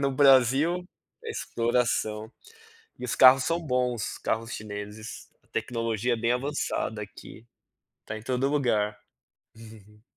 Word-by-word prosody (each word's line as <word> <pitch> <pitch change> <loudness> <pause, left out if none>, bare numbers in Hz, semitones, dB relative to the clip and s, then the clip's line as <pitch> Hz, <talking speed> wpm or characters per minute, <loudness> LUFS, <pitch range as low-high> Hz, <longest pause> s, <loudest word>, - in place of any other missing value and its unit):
no 140 -1 +1
Brasil 135 +6 +4 0.4
é 455 - -4
exploração. 115 - -1 0.7
E - - -7
os 120 - -1
carros 130 0 +7
são 170 +1 0
bons, 125 -4 0
os - - -8
carros 115 +1 -2
chineses, 105 +1 -7
a - - -32
tecnologia 115 0 -1
é - - -3
bem 115 +1 +1
avançada 125 -4 -2
aqui, 110 +2 -12 0.5
está 110 - -7
em 110 - -9
todo 130 +3 0
lugar. 110 -8 +1 0.6
uhum. 110 -1 -15
120 Hz, 135 wpm, -27 LUFS, 110-130 Hz, 0.7 s, carros